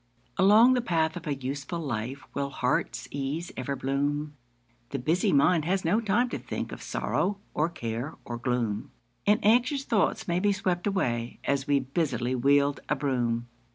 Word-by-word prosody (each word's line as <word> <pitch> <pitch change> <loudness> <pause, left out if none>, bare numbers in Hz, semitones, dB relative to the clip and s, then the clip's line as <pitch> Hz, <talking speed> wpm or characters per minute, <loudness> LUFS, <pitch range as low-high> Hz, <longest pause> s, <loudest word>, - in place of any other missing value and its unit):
Along 215 +6 +7
the 250 - +2
path 160 -7 +1
of 170 -2 -7
a 145 - 0
useful 140 +5 -4
life 130 -2 -4
Will 140 0 -2
heart's - - -1
ease 145 +5 -3
ever 135 +2 -3
bloom; 145 +3 -1 0.5
The 140 - -3
busy 160 +8 +1
mind 155 +3 +4
has 185 +1 0
no 210 +8 +3
time 230 +3 +2
to - - -4
think - - -5
Of - - -8
sorrow, 200 +1 -1 0.2
or 155 +3 +1
care, 120 -1 -4
or 120 -1 -5
gloom; 120 -4 -1 0.4
And 210 +1 +5
anxious 250 +5 +3
thoughts 220 -7 +1
may 175 0 +1
be 205 +1 +2
swept 185 -1 -1
away 120 -12 -1
As 140 -1 0
we 145 -1 +4
busily 130 -3 -1
wield 140 +3 +3
a - - +3
broom. 120 -4 0
145 Hz, 170 wpm, -28 LUFS, 130-185 Hz, 0.5 s, Along